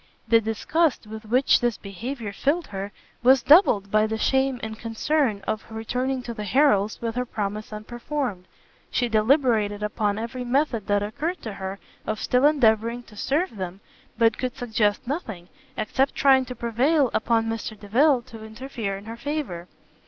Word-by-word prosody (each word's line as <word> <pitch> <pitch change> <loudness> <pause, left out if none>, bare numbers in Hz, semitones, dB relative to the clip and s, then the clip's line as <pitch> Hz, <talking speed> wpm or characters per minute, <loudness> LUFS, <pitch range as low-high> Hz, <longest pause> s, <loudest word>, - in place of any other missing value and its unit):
The 230 -1 +5
disgust 265 +7 0
with 220 +1 -9
which 250 +5 +4
this 240 -2 0
behaviour 215 +2 -6
filled 300 - 0
her, 200 0 -6 0.3
was 260 +2 +5
doubled 220 - +5
by 215 0 +3
the 220 0 -2
shame 265 +2 +1
and 220 0 -5
concern 230 -1 0
of 215 - -2
returning 250 +4 -2
to 235 - -5
the 210 - -6
Harrels 210 -3 +2
with 230 -1 -2
her 250 +2 -1
promise 215 -2 -4
unperformed; 235 -1 -4 0.4
she 245 - 0
deliberated 220 -3 +2
upon 210 -1 -1
every 235 +3 -4
method 245 -3 0
that 205 0 +2
occurred 305 - -3
to 220 - -5
her 190 0 -5 0.3
of 215 0 -2
still 250 +3 +3
endeavouring 235 -4 +2
to 220 - -17
serve 285 - -1
them, 185 0 -5 0.4
but 230 -2 +3
could 255 -1 -3
suggest 220 -2 0
nothing, 220 - -5 0.3
except 265 +6 0
trying 265 -2 +4
to 250 0 -7
prevail 255 +5 +2
upon 225 0 +1
Mr 225 -1 -4
Delvile 250 +5 +3
to 230 -3 -11
interfere 220 -3 -5
in 200 - -12
her 225 +1 -7
favour. 235 - -4
230 Hz, 165 wpm, -24 LUFS, 210-265 Hz, 0.4 s, The